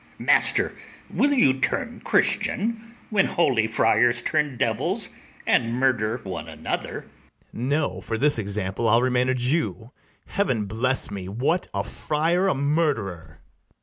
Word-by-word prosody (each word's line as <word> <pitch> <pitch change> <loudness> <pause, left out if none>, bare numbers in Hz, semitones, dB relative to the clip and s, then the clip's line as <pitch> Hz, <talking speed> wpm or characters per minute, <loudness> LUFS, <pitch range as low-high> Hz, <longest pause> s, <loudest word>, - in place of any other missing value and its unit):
master, - - +2 0.4
will 285 - +2
you 245 - +4
turn 140 - -1
Christian, 230 +2 0 0.2
when 200 -2 +3
holy 125 -10 +2
friars 120 +2 +2
turn 150 -4 0
devils - - -1 0.4
and 115 0 +2
murder 120 -3 +1
one 95 -2 -6
another? - - -4
BARABAS. - - -22 0.4
No; 135 -4 -1
for 115 +2 -3
this 145 0 +4
example 100 +1 -2
I'll 115 +3 +4
remain 125 0 +1
a 130 - +2
Jew: 125 -2 -1 0.3
Heaven 130 - -1
bless 115 +4 0
me! 95 -2 -6
what, 135 - 0
a 100 0 -2
friar 165 - 0
a 190 - +2
murderer! 140 - -1
125 Hz, 135 wpm, -24 LUFS, 110-150 Hz, 0.4 s, you